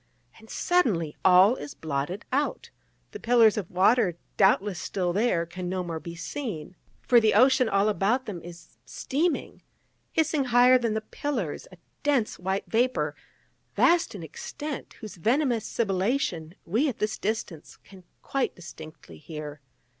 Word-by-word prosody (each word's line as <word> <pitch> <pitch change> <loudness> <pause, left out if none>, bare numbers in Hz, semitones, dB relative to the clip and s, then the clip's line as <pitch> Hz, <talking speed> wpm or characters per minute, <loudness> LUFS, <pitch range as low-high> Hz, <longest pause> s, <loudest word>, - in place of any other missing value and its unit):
And 220 0 -17
suddenly, 205 - +1
all 190 +5 +6
is 145 - -8
blotted 155 +5 -4
out: 290 - -1 0.4
the 425 - -8
pillars 230 - +4
of 200 -5 -4
water, 185 -1 +3 0.2
doubtless 195 -1 +3
still 180 -3 -2
there, 200 -5 +1
can 175 +1 -6
no 185 0 -2
more 165 -2 -4
be 170 +1 -8
seen: 185 - -6 0.3
for 245 - +5
the 220 -2 +2
ocean 255 +1 +5
all 200 +1 +2
about 215 +6 +1
them 195 -6 -6
is 170 0 -13
steaming, 315 +5 -2 0.5
hissing 310 -3 +1
higher 250 +1 +5
than 230 -3 -1
the 220 - -1
pillars 220 - -4
a 185 - -14 0.2
dense 275 -7 0
white 190 +2 -2
vapour, 245 +3 +1 0.6
vast 340 -8 +3
in 180 - -7
extent, 290 - -7
whose 215 -4 -8
venomous 240 - +1
sibilation 190 - -1
we 235 - +1
at 250 - -5
this 215 +1 -2
distance 200 -7 -4
can 190 -2 -16 0.2
quite 275 -1 -1
distinctly 155 - -12
hear. 150 - -8
210 Hz, 145 wpm, -26 LUFS, 175-250 Hz, 0.6 s, all